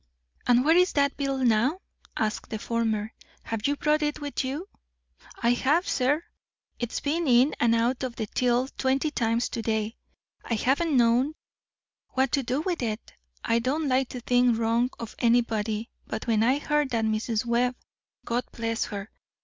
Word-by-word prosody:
"And 245 +1 +4
where 320 +2 +5
is 360 +1 +4
that 280 -1 +2
bill 275 -1 -1
now?" 235 +8 +3 0.4
asked 215 -1 -2
the 220 - -3
former. 220 -1 -1 0.3
"Have 225 +1 -2
you 285 - +1
brought 300 0 +1
it 295 -1 -1
with 290 -1 -3
you?" 285 +8 -4 0.8
"I 235 - +4
have, 290 +8 +2
sir. 285 +5 +1 0.6
It's 240 -1 -2
been 315 +3 -1
in 255 +3 +5
and 230 -1 +4
out 240 +3 +1
of 255 -3 -3
the 220 - -3
till 245 +3 +1
twenty 270 +4 0
times 230 -2 0
to 230 - -4
day. 220 0 -1 0.5
I 230 - -1
haven't 280 +6 +1
known 245 +5 +3 0.8
what 265 -1 +1
to 280 - +2
do 255 +3 -1
with 350 -2 -2
it. 220 -2 -4 0.3
I 230 0 +2
don't 285 +6 -1
like 260 -1 +1
to 250 - -6
think 245 -1 +3
wrong 230 +2 +1
of 230 -2 -7
anybody, 230 -2 +1 0.2
but 220 - -4
when 225 -2 +2
I 255 +5 +3
heard 295 -1 0
that 230 -3 0
Mrs. 220 +1 -1
Webb 245 +1 +1 0.5
(God 240 +1 -1
bless 230 -1 -2
her!) 205 0 -6
245 Hz, 175 wpm, -27 LUFS, 230-280 Hz, 0.8 s, where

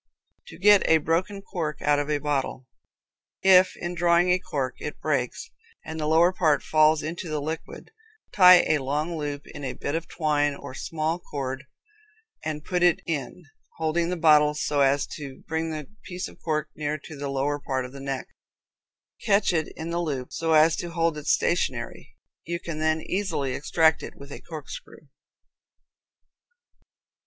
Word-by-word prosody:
To - - -11
Get 205 -1 +6
a 160 - +7
Broken 180 +6 -1
Cork 160 -7 -4
Out 145 0 +3
of 145 0 -3
a 150 - +2
Bottle. 140 -3 -2 0.8
If, 185 -1 +6
in 175 0 -4
drawing 175 +1 +3
a 180 - +3
cork, 135 -7 -3
it 150 - -6
breaks, 135 -5 -2 0.3
and 160 0 -6
the 150 - -1
lower 165 +4 +4
part 155 -6 +2
falls 155 0 +4
down 155 - -3
into 170 0 -6
the 155 -1 -1
liquid, 160 - -6 0.4
tie 180 -2 +8
a 155 - +2
long 150 +5 -2
loop 145 -2 -4
in 145 - -10
a 130 - -3
bit 145 - -4
of 165 +1 -2
twine, 145 -3 0
or - - -9
small 160 +4 -2
cord, 135 -4 -5 0.8
and 155 -1 -4
put 180 -1 -1
it 175 -1 +3
in, 155 +1 -4 0.3
holding 165 +1 0
the 180 - -2
bottle 150 -2 +5
so 145 -1 0
as 140 +1 +3
to 140 -3 -9
bring 160 +1 -2
the 155 -2 -5
piece 180 -1 -5
of - - -16
cork 155 -2 -1
near 150 0 -2
to 155 +1 -11
the 140 0 -4
lower 140 +2 -1
part 130 -2 -2
of 125 - -9
the 140 - -10
neck. 135 -1 -4 1.0
Catch 200 -2 +3
it 160 -2 0
in 165 +1 -5
the 170 +1 -1
loop, 135 -6 -4
so 165 -1 0
as 155 +1 +5
to 175 - -4
hold 165 -1 0
it 150 - -8
stationary. - - -1 0.3
You 170 +1 -3
can 165 -3 -6
then 155 0 +1
easily 175 -9 -2
extract 160 +4 +2
it - - -8
with 140 0 -12
a - - -8
corkscrew. 155 -1 -10
155 Hz, 175 wpm, -25 LUFS, 145-170 Hz, 1.0 s, tie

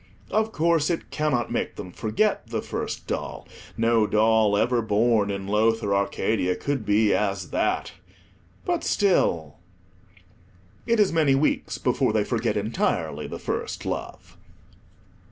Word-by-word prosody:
Of 220 +1 +1
course, 165 -3 +2
it 170 - -3
cannot 150 -7 0
make 120 - -2
them 90 -3 -8
forget 115 - 0
the 115 -1 -3
first - - -4
doll; - - -5 0.3
no 115 -1 +3
doll 110 -1 +3
ever 120 +2 +2
born 110 -1 +2
in 100 -1 -3
Lowther 105 0 +1
Arcadia 100 -1 0
could 135 +1 -3
be 105 0 +3
as 100 -3 -1
that, - - 0 0.7
but 350 -1 -1
still— 85 - +1 1.3
It 230 -1 +2
is 205 -5 +3
many 150 -5 +3
weeks 145 +3 0
before - - +1
they 110 -1 +2
forget 115 -1 -1
entirely 105 +3 -1
the - - -6
first - - -4
love. - - -6
110 Hz, 135 wpm, -25 LUFS, 105-145 Hz, 1.3 s, no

